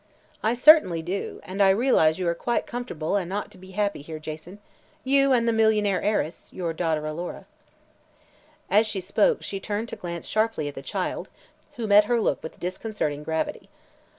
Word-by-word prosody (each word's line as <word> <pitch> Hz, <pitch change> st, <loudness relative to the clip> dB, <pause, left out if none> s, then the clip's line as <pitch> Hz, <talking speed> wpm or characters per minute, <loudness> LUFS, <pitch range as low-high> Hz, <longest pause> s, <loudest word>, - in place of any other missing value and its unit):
"I 225 Hz, +2 st, +1 dB
certainly 245 Hz, -, +6 dB
do, 185 Hz, +4 st, -4 dB
and 190 Hz, +2 st, -4 dB
I 195 Hz, -, +6 dB
realize 190 Hz, -7 st, +4 dB
you 185 Hz, -2 st, -2 dB
are 170 Hz, -, +2 dB
quite 240 Hz, +8 st, -1 dB
comfortable 205 Hz, -9 st, -3 dB
and 185 Hz, -3 st, -1 dB
ought 205 Hz, +1 st, -3 dB
to 195 Hz, -, -15 dB
be 185 Hz, +1 st, -13 dB
happy 205 Hz, -6 st, 0 dB
here, 155 Hz, +2 st, -7 dB
Jason 155 Hz, +4 st, -8 dB, 0.5 s
you 275 Hz, +1 st, +3 dB
and 235 Hz, -2 st, +3 dB
the 230 Hz, -, +3 dB
millionaire 215 Hz, -3 st, +2 dB
heiress, 205 Hz, -6 st, -2 dB
your 170 Hz, -3 st, -3 dB
daughter 160 Hz, -2 st, -1 dB
Alora." 165 Hz, +3 st, -5 dB, 1.2 s
As 215 Hz, +2 st, +4 dB
she 205 Hz, -2 st, -3 dB
spoke 200 Hz, -, +1 dB
she 195 Hz, -, -4 dB
turned 210 Hz, +3 st, -3 dB
to -, -, -5 dB
glance 170 Hz, -1 st, -6 dB
sharply 215 Hz, -8 st, 0 dB
at 145 Hz, -, -5 dB
the 135 Hz, -, -8 dB
child, -, -, -3 dB, 0.5 s
who 235 Hz, -, -3 dB
met 210 Hz, 0 st, +6 dB
her 235 Hz, +2 st, +1 dB
look -, -, 0 dB
with 160 Hz, -, -9 dB
disconcerting 180 Hz, -5 st, -3 dB
gravity. 160 Hz, +1 st, -3 dB
195 Hz, 180 wpm, -25 LUFS, 165-220 Hz, 1.2 s, certainly